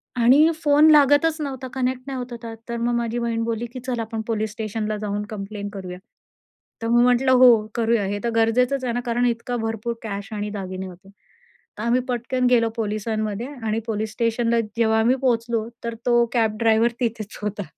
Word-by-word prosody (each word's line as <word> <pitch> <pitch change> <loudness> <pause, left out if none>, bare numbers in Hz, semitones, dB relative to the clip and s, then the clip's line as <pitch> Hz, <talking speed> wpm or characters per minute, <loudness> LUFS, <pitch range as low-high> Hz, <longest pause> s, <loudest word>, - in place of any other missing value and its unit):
आणि 260 +6 +5
फोन 295 +1 +6
लागतच 295 +2 +5
नव्हता. 265 -3 -4
कनेक्ट 255 -1 -1
नाही 270 -1 -4
होत 250 0 -6
होता. 230 -1 -7 0.2
तर 235 - -2
मग 235 +1 0
माझी 235 0 -1
बहीण 230 -1 -1
बोलली 230 0 -2
की 255 - -6
"चल 245 -2 -1
आपण 225 0 -3
पोलिस 220 -2 -1
स्टेशनला 215 0 -3
जाऊन 205 0 -2
कम्प्लेन्ट 205 -1 -6
करूया. 185 -2 -7 0.8
तर 230 - -2
मग 240 +1 +4
म्हटलं, 250 +1 +3
"हो 255 0 +8 0.3
करूया." 230 -2 +1
हे 205 +1 -2
तर 235 - 0
गरजेचंच 250 +4 +2
आहे 245 -2 -1
ना, 240 - -1
कारण 240 +1 +1
इतका 235 +1 -2
भरपूर 225 +1 -3
कॅश 200 -2 -5
आणि 210 0 -3
दागिने 190 -2 -5
होते. 185 +1 -14 0.7
तर 210 - -5
आम्ही 240 +2 +2
पटकन 250 +2 -1
गेलो 230 -2 +3
पोलिसांमध्ये 215 +1 -2 0.2
आणि 220 0 0
पोलिस 215 -1 -2
स्टेशनला 230 0 +1 0.2
जेव्हा 220 -1 +3
आम्ही 235 +3 +3
पोहोचलो 230 -3 0 0.2
तर 235 0 -3
तो 240 -1 +4
कॅब 220 -3 +1
ड्रायव्हर 230 +1 +3
तिथेच 225 -3 -3
होता. 210 0 -3
230 Hz, 185 wpm, -23 LUFS, 215-245 Hz, 0.8 s, हो